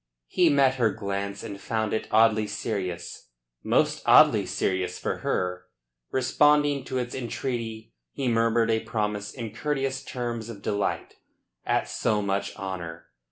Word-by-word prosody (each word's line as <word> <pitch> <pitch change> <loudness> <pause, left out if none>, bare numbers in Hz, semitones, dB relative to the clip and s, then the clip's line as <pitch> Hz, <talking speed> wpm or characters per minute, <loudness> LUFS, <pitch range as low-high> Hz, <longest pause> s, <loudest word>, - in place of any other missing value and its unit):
He 175 -2 +4
met 135 -2 +4
her 115 -3 +3
glance, 100 -1 -4
and 100 -3 -7
found 110 0 -1
it 110 - -2
oddly 110 -1 +4
serious 100 - -4 0.3
most - - +2
oddly - - +6
serious 95 -1 -1
for - - -2
her. 90 0 -2 0.4
Responding 145 +2 +3
to 130 - -3
its 125 -1 -3
entreaty, 115 - -4 0.2
he 135 - -3
murmured 115 -1 +2
a 110 - +2
promise 105 -2 -2
in 115 -4 -6
courteous 135 +2 -2
terms 120 -4 -4
of 100 -4 -9
delight 100 0 -2 0.5
at - - +1
so 105 -2 0
much 100 0 -2
honour. 85 -5 -6
110 Hz, 140 wpm, -26 LUFS, 100-125 Hz, 0.5 s, oddly